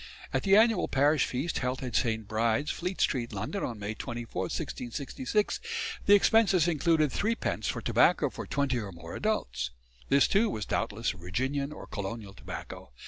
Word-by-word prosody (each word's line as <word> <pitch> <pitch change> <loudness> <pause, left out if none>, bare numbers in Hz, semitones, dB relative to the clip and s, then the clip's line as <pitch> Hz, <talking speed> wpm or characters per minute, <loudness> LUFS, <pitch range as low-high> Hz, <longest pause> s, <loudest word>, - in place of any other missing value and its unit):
At - - +2
the 195 0 +5
annual 225 -3 +4
parish 145 +2 +3
feast 135 +7 -2
held 125 +1 -2
at 125 -2 -4
St. 110 -4 0
Bride's, 115 +6 +1
Fleet 180 +2 -4
Street, 120 -3 +1
London, 115 - -3
on 115 - -3
May 105 +1 -4
24, 120 +1 -5
1666, 180 - -2 0.5
the 205 - +9
expenses 200 -5 +4
included 160 -2 +2
3d. 230 +3 -1
for - - -1
tobacco - - +3
for - - -7
twenty 140 -3 0
or 105 -3 -5
more 85 -1 -9
adults. 70 - -1 0.4
This 140 0 +5
too 220 +3 +3
was 105 -2 -3
doubtless 115 +3 -1
Virginian 130 - -2
or 150 - -8
colonial 100 0 -5
tobacco. - - -8
130 Hz, 160 wpm, -29 LUFS, 110-175 Hz, 0.5 s, the